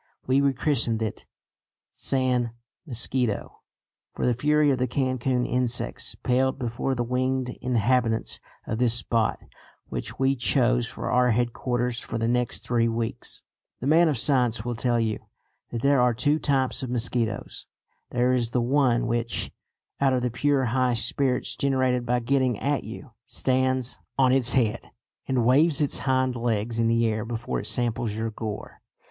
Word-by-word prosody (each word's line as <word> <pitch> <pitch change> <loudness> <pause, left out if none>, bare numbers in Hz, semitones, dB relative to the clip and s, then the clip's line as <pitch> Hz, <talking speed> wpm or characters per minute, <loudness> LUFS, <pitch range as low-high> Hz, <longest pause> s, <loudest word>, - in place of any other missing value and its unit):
We 130 +2 +3
rechristened 135 -4 +1
it 110 - -5 0.6
San 125 -3 +1 0.3
Mosquito, 120 -3 +1 0.6
for - - -2
the 125 - +3
fury 150 +4 +2
of 130 - 0
the 125 - +1
Cancun 130 -1 0
insects 125 -1 0
paled 130 +2 0
before 130 +1 -2
the 120 - -1
winged 130 +1 -1
inhabitants 120 -1 +1 0.3
of 110 - -3
this 120 -2 +4
spot 115 -1 0 0.5
which - - -5
we 135 +1 +2
chose 125 -1 +2
for - - -5
our 125 0 +3
headquarters 120 +1 -1
for 115 - -5
the 115 0 -1
next 125 0 0
three 120 -1 +2
weeks. 115 0 -2 0.4
The - - -5
man 165 +4 +5
of 145 - 0
science 120 -2 +2
will 120 - -2
tell 120 0 0
you 110 -2 -1 0.5
that 115 -1 -5
there 140 -2 +4
are 125 -1 +3
two 145 +6 +2
types 135 -4 0
of 130 - -4
mosquitoes. 115 -3 -2 0.4
There 125 +1 +1
is 120 -2 0
the 125 - 0
one 125 -1 +2
which, 115 0 -1 0.5
out 135 -1 +3
of 125 -1 0
the 125 - 0
pure 135 +2 +1
high 125 +1 +1
spirits 125 +2 -1
generated 130 -3 0
by 125 0 +1
getting 130 -2 +1
at 145 +4 -1
you, 115 +5 -9 0.2
stands 130 -2 0 0.2
on 130 -1 +4
its 125 -2 +3
head 120 -3 0 0.4
and 125 -3 +1
waves 145 +5 +4
its 145 -2 +2
hind 130 -2 +1
legs 115 -1 -1
in 115 - +2
the 115 0 +2
air 110 0 -1
before 115 0 -3
it - - -6
samples 120 -2 -1
your 110 +1 -3
gore. 105 -1 -7
125 Hz, 160 wpm, -25 LUFS, 115-130 Hz, 0.6 s, man